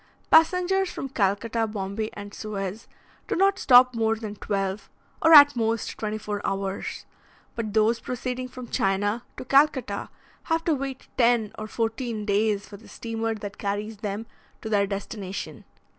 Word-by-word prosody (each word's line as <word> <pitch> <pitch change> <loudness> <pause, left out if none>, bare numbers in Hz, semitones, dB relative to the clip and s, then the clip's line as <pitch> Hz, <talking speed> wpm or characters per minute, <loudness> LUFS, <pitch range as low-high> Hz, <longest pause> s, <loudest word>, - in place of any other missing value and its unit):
Passengers 360 +4 +4
from 270 - -5
Calcutta, 225 +1 0
Bombay, 210 +1 -3
and 205 0 -9
Suez, 205 0 -5 0.4
do - - -1
not 390 +2 +3
stop 250 -1 +7
more 225 -1 +1
than 215 -2 -6
twelve, 195 0 -3 0.3
or, 325 - +5
at 290 -3 +10
most, 225 -1 -1
twenty 215 0 -3
four 210 -1 -4
hours; 195 0 -3 0.5
but 215 -2 -4
those 220 +2 +3
proceeding 255 0 -4
from 250 -1 -9
China 205 +3 0
to - - -7
Calcutta 270 -6 +2 0.4
have 325 0 0
to 330 - +2
wait 270 -2 -5
ten 235 -3 +3
or 215 - -6
fourteen 225 -1 -3
days 205 0 +1
for 200 - -10
the 220 - -17
steamer 225 -1 -3
that 205 -1 -8
carries 205 +2 -3
them 205 +1 -4 0.4
to 220 - -4
their 200 -2 +2
destination. 195 -1 -6
220 Hz, 155 wpm, -25 LUFS, 205-250 Hz, 0.5 s, at